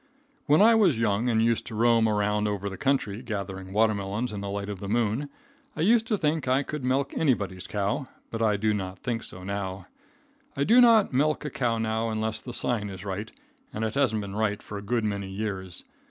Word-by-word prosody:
When 150 +7 +6
I 230 +1 +7
was 195 - +4
young 115 +1 +1
and 110 -1 +3
used 115 -1 0
to 115 - -6
roam 115 0 +4
around 105 0 +1
over 100 -1 -2
the - - -6
country, 120 -4 0
gathering 100 -5 -5
water 110 +2 +3
melons 105 +4 -3
in 100 - -4
the 100 - -4
light 100 0 -3
of 100 -2 -5
the 100 - -6
moon, 120 +5 0 0.5
I 155 - -3
used 225 +5 +4
to 215 - +1
think 155 -3 0
I 130 +2 +3
could 150 -1 -5
milk 135 +2 0
anybody's 100 - 0
cow, 105 +6 -1 0.2
but 115 - -3
I 105 -2 +3
do 110 +1 +1
not 95 -2 -4
think 115 -2 -3
so 90 - -8
now. 95 -1 -4 0.7
I 140 - +2
do 235 - +6
not 225 - +5
milk 150 +3 +1
a 150 - -3
cow 120 -3 0
now 110 0 -1
unless 110 0 -2
the 125 - -7
sign 115 -3 0
is 95 0 -8
right, 100 +3 -4 0.4
and 110 - -4
it 110 - -2
hasn't 130 -6 +1
been 100 -1 -6
right 105 -1 -1
for 105 - -6
a - - -8
good 115 +3 -1
many 100 -2 -2
years. 95 -2 -4
110 Hz, 220 wpm, -27 LUFS, 100-130 Hz, 0.7 s, I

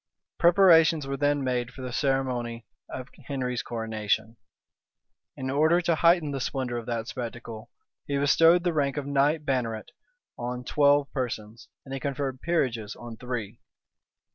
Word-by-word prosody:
[*] - - -65
Preparations 165 -4 +5
were 135 0 -3
then 145 0 +1
made 125 -2 -1
for 130 - -10
the 125 - -5
ceremony 125 -4 -1 0.2
of 130 -1 -6 0.2
Henry's 125 -3 -2
coronation. 110 -1 -2 1.0
In 130 0 -3
order 155 +5 +4
to 170 -1 +1
heighten 170 -2 +3
the 135 - -3
splendor 130 -2 -2
of 115 - -10
that 115 -2 -3
spectacle, 115 -3 -7 0.4
he 140 - 0
bestowed 165 +5 +5
the 175 -2 +1
rank 140 -2 0
of 145 - -2
knight 145 +2 +1
banneret 120 -6 -2 0.5
on 125 +1 -4
twelve 145 +1 +3
persons; 115 -4 -5 0.2
and 135 - -8
he 135 - -3
conferred 135 -1 -3
peerages 125 -11 -1
on 120 -1 -9
three. 120 -4 -5
135 Hz, 150 wpm, -27 LUFS, 120-145 Hz, 1.0 s, Preparations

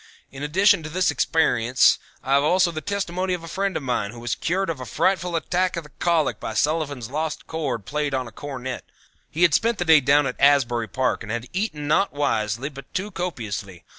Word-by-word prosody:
In 135 - -9
addition 170 +5 +3
to 155 - -7
this 180 +3 +1
experience 125 -6 +3 0.2
I 135 +1 0
have 140 +1 +4
also 180 +3 +3
the 155 -1 -5
testimony 185 0 -2
of 170 - -9
a - - -8
friend 195 +2 -1
of - - -6
mine 120 -5 -1
who 120 +3 -10
was 120 -1 -2
cured 190 +3 -1
of 160 -5 -3
a 130 - -6
frightful 180 - 0
attack 180 +2 0
of 170 - -3
the 150 - -16
colic 170 -4 +1
by 110 - -5
Sullivan's 145 -3 -1
Lost 155 +1 -3
Chord 140 -10 -3
played 150 +4 -1
on 130 -2 -2
a - - -10
Cornet. 130 0 -6 0.5
He 170 - 0
had 170 -3 +5
spent 230 0 +2
the 175 - -1
day 160 -2 +7
down 145 +1 +3
at 125 - -4
Asbury 130 -5 +3
Park 130 +2 -1
and 110 - -6
had 120 +1 -3
eaten 170 -7 -2
not 175 +6 +2
wisely 120 -4 -1
but 140 -2 -12
too 200 +3 -2
copiously. 110 - -5
150 Hz, 215 wpm, -23 LUFS, 125-175 Hz, 0.5 s, day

